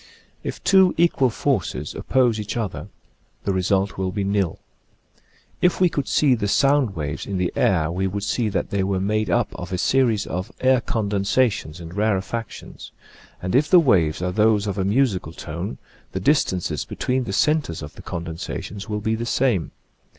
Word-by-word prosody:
If - - -6
two 190 -2 +5
equal 165 -6 +3
forces 120 - -1
oppose 125 -4 +1
each 105 +2 -4
other 110 -5 -4 0.6
the 100 - 0
result 95 +1 0
will 95 -1 -1
be 100 0 -2
nil. 100 -4 0 1.0
If 180 - +3
we 180 -1 +5
could 140 -4 -3
see 145 -4 +3
the 105 -4 -1
sound 135 -1 +3
waves 75 -2 -4
in 100 -2 -2
the 90 -1 -1
air 80 -4 +2
we 95 +2 -1
would 100 +2 -4
see 105 +2 0
that 95 - -2
they 100 -1 +1
were 95 0 0
made 105 +1 0
up - - +1
of 90 +1 -7
a 90 - -1
series 115 0 +2
of 90 +4 -4
air 130 -1 +3
condensations 100 -5 0
and 85 0 -9
rarefactions, 105 +2 -3 0.5
and 90 - -2
if 145 +5 +3
the 180 - +8
waves 90 - +2
are 90 - 0
those 105 +1 +3
of 100 -1 -3
a - - +1
musical 100 - +1
tone 85 -2 -6 0.4
the 95 - -2
distances 95 - +1
between 130 0 -2
the - - -4
centres 140 - +1
of 75 - -8
the - - -11
con 85 -1 -5
densations 95 +5 -6
will 105 0 -2
be 110 +1 0
the 115 +1 -3
same. 120 -10 +1
100 Hz, 180 wpm, -22 LUFS, 95-125 Hz, 1.0 s, the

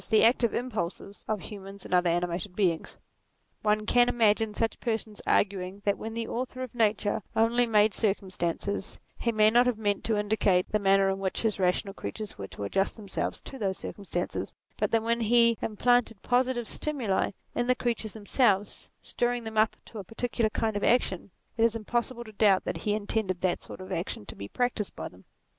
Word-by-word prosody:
the 220 -1 +5
active 235 0 +4
impulses 205 -4 -4
of 215 -3 -1
human 195 0 -9
and - - -5
other 180 -1 +4
animated 175 +2 -1
beings. 175 -6 0 0.6
One 210 0 +1
can 245 +2 +4
imagine 220 -2 +2
such 225 -1 -1
persons 220 -3 -3
arguing 195 0 +1
that 200 -1 +3
when 225 0 -6
the 230 -1 -2
Author 255 +1 -4
of 255 - -7
Nature 215 -3 +1
only 235 +2 +3
made 210 -1 +4
circumstances, 195 -2 -2 0.2
he 235 - +1
may 215 -1 +5
not 245 +2 +5
have 245 -3 +1
meant 205 -2 0
to 220 -2 +1
indicate 205 -3 +2
the 215 - +2
manner 195 -1 +4
in 195 - -3
which 190 +2 -2
his 215 -3 0
rational 190 +2 +1
creatures 215 +1 -6
were 100 - -6
to 100 - -7
adjust 195 - 0
themselves 205 -4 -4
to 270 - -9
those 190 -2 -1
circumstances; 180 -3 -4 0.2
but - - 0
that 225 -1 +2
when 235 +1 +1
he 235 +1 +5
implanted 225 0 +2
positive 245 -1 +1
stimuli 255 -11 +1 0.2
in 240 0 -1
the 250 - +4
creatures 230 -4 -2
themselves, 205 -2 +1
stirring 240 0 -1
them 220 -1 -6
up 215 +1 +3
to 220 - -9
a - - -5
particular 225 +2 -1
kind 220 0 -1
of 205 - -2
action, 205 -6 +2 0.3
it 225 - +3
is 230 0 +3
impossible 235 +2 -2
to 220 - -11
doubt 200 -2 +4
that - - -3
he 210 -1 0
intended 205 -3 -1
that 185 -2 0
sort - - -10
of 185 +1 -9
action 170 - -3
to - - -8
be 100 - -7
practised 245 - -2
by - - -5
them. - - -16
215 Hz, 190 wpm, -28 LUFS, 195-235 Hz, 0.6 s, the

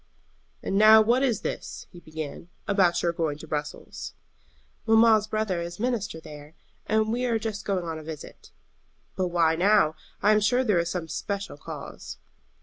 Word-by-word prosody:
"And 195 - 0
now 215 +1 +9
what 235 +4 +3
is 245 -7 +1
this," - - -5
he 175 - -12
began, 155 0 -8 0.2
"about 190 -4 +2
your 170 -1 +1
going 160 -4 -2
to 160 - -11
Brussels?" 150 -1 -5 0.7
"Mamma's 220 -1 +5
brother 215 -5 -1
is 170 +2 -6
minister 230 -8 -2
there, 150 -1 -12 0.3
and 220 +1 +1
we 245 +1 -1
are 235 -2 +1
just 215 -2 -5
going 190 -3 -1
on 160 -1 -4
a - - -10
visit." 155 -1 -10 0.7
"But 185 - 0
why 170 -2 +2
now? 180 -3 +3 0.3
I 210 - +5
am 215 - +5
sure 245 +5 +2
there 210 -8 +2
is 170 0 -1
some 175 -1 -3
especial 200 +1 -4
cause." - - -8
190 Hz, 170 wpm, -26 LUFS, 160-215 Hz, 0.7 s, now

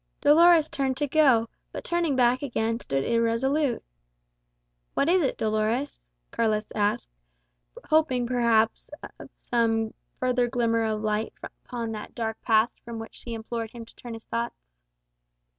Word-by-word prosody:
Dolores 320 +2 +6
turned 265 -3 -1
to 295 - +1
go, 270 -6 +4 0.2
but - - -6
turning 345 -5 0
back 250 0 +3
again, 230 -4 -1
stood 135 - -2
irresolute. 235 - +1 1.1
"What 280 - +2
is 360 +2 +4
it, 275 - 0
Dolores?" 220 +5 -1 0.3
Carlos 215 -2 0
asked; 205 - 0 0.8
hoping, 285 -6 +2
perhaps, 235 -2 +1 0.3
for - - -12
some 225 -2 0 0.3
further 250 -1 +1
glimmer 230 -2 +1
of 215 -1 -2
light 215 +1 -1
upon 235 -2 -6
that 215 -1 -7
dark 225 -2 -3
past, 220 +1 +2
from 235 -1 -8
which 225 0 -8
she 235 -1 -7
implored 225 0 -4
him 230 0 -10
to - - -19
turn 240 -2 -8
his 225 - -11
thoughts. 235 +1 -3
235 Hz, 140 wpm, -26 LUFS, 225-260 Hz, 1.1 s, Dolores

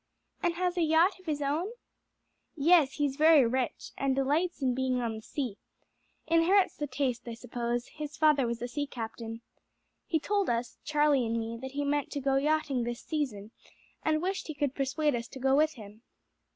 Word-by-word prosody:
"And 345 -1 +1
has 360 0 -1
a - - +2
yacht 330 +4 +3
of 370 - -20
his 295 -2 -1
own?" 320 +10 -1 0.8
"Yes; 315 -2 +4
he's 285 -2 -1
very 310 -3 +7
rich, 250 +2 -2
and 270 -1 0
delights 300 +7 +1
in 260 -3 +1
being 260 0 0
on 230 -2 -2
the - - -8
sea. 245 -3 -4 0.7
Inherits 340 +4 +3
the 295 - -3
taste, 255 -3 -2
I 230 - -5
suppose; 240 +1 -3
his 300 -1 -8
father 300 -5 +4
was 235 0 -3
a - - -1
sea 290 +3 -3
captain. 225 -2 -6 0.7
He 320 - +1
told 405 +4 0
us 235 0 -2
Charlie 295 -4 +2
and 230 +1 0
me 225 +1 -4
that 265 0 -6
he 285 0 -1
meant 290 0 0
to 290 - -2
go 270 0 +1
yachting 290 -2 +1
this 240 0 -4
season, 230 -10 -3 0.5
and 310 +1 +1
wished 385 +1 -2
he 310 - -5
could 285 -2 -1
persuade 285 +2 0
us 235 -1 -3
to 265 - -10
go 265 +1 +3
with 310 +2 +3
him." 215 -3 -12
280 Hz, 190 wpm, -30 LUFS, 245-310 Hz, 0.8 s, very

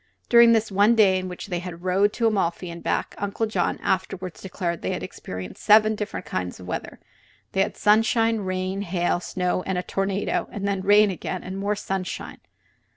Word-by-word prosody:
During 235 -1 +7
this 220 -1 +1
one 205 +4 +4
day 195 -4 +5
in 185 - -5
which 180 - -7
they 180 -3 -3
rode 180 +3 0
to 230 - -1
Amalfi 185 -5 0
and 170 0 -9
back, - - -1
Uncle 205 +2 -1
John 215 - -1
afterward 185 -1 -1
declared 175 -3 -4
that - - -2
they - - -1
experienced 90 0 -7
seven 215 +1 +6
different 210 -1 -5
kinds 90 0 -4
of 90 - -10
weather. 90 - -5 0.5
They 195 - +1
had 195 - -1
sunshine, 225 +1 +3
rain, 185 0 -2
hail, 175 -2 0
snow 180 0 -1
and 190 0 -2
a 180 - -1
tornado; 195 +1 -1
and 200 -1 -3
then 195 -1 -1
rain 205 +1 +5
again 185 0 -5
and 185 +1 -6
more 200 +2 -1
sunshine. 190 -2 -4
195 Hz, 185 wpm, -24 LUFS, 180-210 Hz, 0.5 s, During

